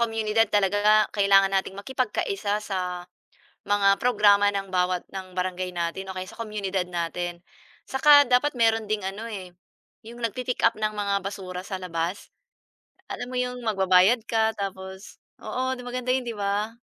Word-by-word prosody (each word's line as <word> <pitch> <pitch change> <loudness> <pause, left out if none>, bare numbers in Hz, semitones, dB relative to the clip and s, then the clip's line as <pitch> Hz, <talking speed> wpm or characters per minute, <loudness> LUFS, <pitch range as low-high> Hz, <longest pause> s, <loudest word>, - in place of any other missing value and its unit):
komunidad 225 -1 +1
talaga, 205 +2 +3
kailangan 195 -1 +4
nating 195 0 -1
makipagkaisa 210 -3 -2
sa, 180 -3 -3 0.6
mga 200 -1 +3
programa 205 -4 +4
ng 195 -1 -3
bawat 180 -1 0
ng 185 -1 -8
barangay 180 0 -3
natin 170 +3 -3
o 190 - -7
kaya 185 - -3
sa 210 - -13
komunidad 200 -4 -3
natin, 175 0 -4 0.4
saka 285 +1 +6
dapat 250 +3 +2
meron 225 -2 +2
ding 210 -2 -1
ano 205 +4 -5
eh, 190 -5 -7 0.6
'yong 235 0 -8
nag-pi-pick-up 240 0 0
ng 215 -1 -2
mga 200 -1 0
basura 190 -2 -6
sa 190 +1 -5
labas. 180 0 -4 0.8
Alam 245 - -6
mo 255 - -4
'yong 250 0 -3
magbabayad 195 +2 +4
ka, 220 -1 +2
tapos 190 -1 -7 0.2
oo, 260 0 -2
'di 250 - -9
maganda 250 0 -5
'yon, 260 -1 0
'di 235 - -4
ba? 205 +3 -2
200 Hz, 155 wpm, -25 LUFS, 190-225 Hz, 0.8 s, saka